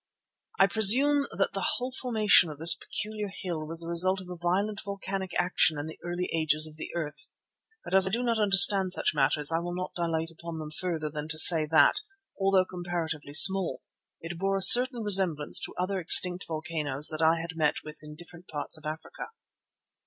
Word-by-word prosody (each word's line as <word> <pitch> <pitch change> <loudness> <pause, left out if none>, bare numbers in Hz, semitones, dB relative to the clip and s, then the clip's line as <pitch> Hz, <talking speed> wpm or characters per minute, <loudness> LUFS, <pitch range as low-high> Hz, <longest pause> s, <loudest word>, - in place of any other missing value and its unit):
I 195 - +4
presume 260 +8 +4
that - - -1
the - - -3
whole 250 +1 -6
formation 220 -9 +1
of 150 - -11
this 165 +2 +6
peculiar 210 +5 -6
hill 170 -6 -7
was 165 +1 -6
the 165 - -9
result 185 +3 -1
of 185 -1 -13
a - - -8
violent 190 +5 -3
volcanic 195 -1 -7
action 175 -3 0
in 145 - -6
the 160 - -11
early 175 +1 -5
ages 155 -1 +1
of 155 -1 -6
the 155 - -10
earth. 155 -3 -7 0.5
But - - -10
as 190 0 +4
I - - -2
do 235 +5 -4
not 230 -2 -2
understand 195 -2 +5
such - - -2
matters 145 +1 -1
I 165 - -1
will 175 +1 -7
not 185 0 -7
dilate 165 -1 -4
upon 165 0 -10
them 155 -1 -9
further 160 -2 -5
than 150 0 -8
to 155 0 -1
say 155 -1 +6
that, 160 - +2 0.4
although 195 -1 +1
comparatively 170 -5 -7
small, 190 +2 +5 0.4
it 165 +1 -10
bore 195 +1 -2
a 195 - -1
certain 245 0 +8
resemblance 185 -7 +1
to - - -12
other 185 +2 -4
extinct 180 +1 +2
volcanoes 155 -3 -3
which 155 +1 -7
I 165 +1 +1
had 165 0 -8
met 155 -2 -2
with 150 0 -12
in 150 0 -10
different 175 +2 -16
parts 150 +1 -5
of 150 - -11
Africa. 155 +1 -9
175 Hz, 195 wpm, -26 LUFS, 155-195 Hz, 0.5 s, certain